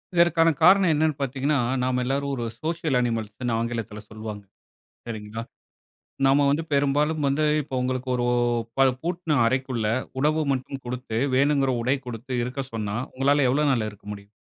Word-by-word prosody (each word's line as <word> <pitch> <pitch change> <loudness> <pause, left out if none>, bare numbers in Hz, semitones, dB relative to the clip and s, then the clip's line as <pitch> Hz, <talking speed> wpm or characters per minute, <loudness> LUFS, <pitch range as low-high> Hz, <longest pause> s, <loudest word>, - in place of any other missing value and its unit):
இதற்கான 170 -1 +5
காரணம் 185 0 +6
என்னன்னு 155 0 +1
பார்த்தீங்கன்னா, 135 +2 0 0.2
நாம 125 0 0
எல்லாரும் 140 +2 -1
ஒரு 120 - -3 0.2
சோசியல் 160 -4 0
அனிமல்ஸ்ன்னு 115 0 -2
ஆங்கிலத்தில 115 -2 -4
சொல்வாங்க. 110 -1 -7 0.7
சரிங்களா! 110 0 -5 0.8
நம்ம 140 +1 +4
வந்து 150 +4 +1
பெரும்பாலும் 145 +2 +1
வந்து 140 +3 +1 0.2
இப்போ 135 -2 -6
உங்களுக்கு 130 0 -2
ஒரு 120 -1 0 0.5
ப 135 0 +6
பூட்ன 170 -3 -1
அறைக்குள்ள 130 -2 0 0.3
உணவு 155 +2 +2
மட்டும் 130 +1 -5
கொடுத்து, 120 -2 -3 0.2
வேணுங்கிற 140 -1 +3
உடை 130 +3 +2
கொடுத்து 120 +2 -6
இருக்க 130 +3 -3
சொன்னா, 105 -2 -3 0.2
உங்களால 135 +1 +3
எவ்வளவு 145 +3 +2
நாள் 115 -5 0
இருக்க 105 -1 -17
முடியும்? 100 0 -12
135 Hz, 145 wpm, -25 LUFS, 115-145 Hz, 0.8 s, காரணம்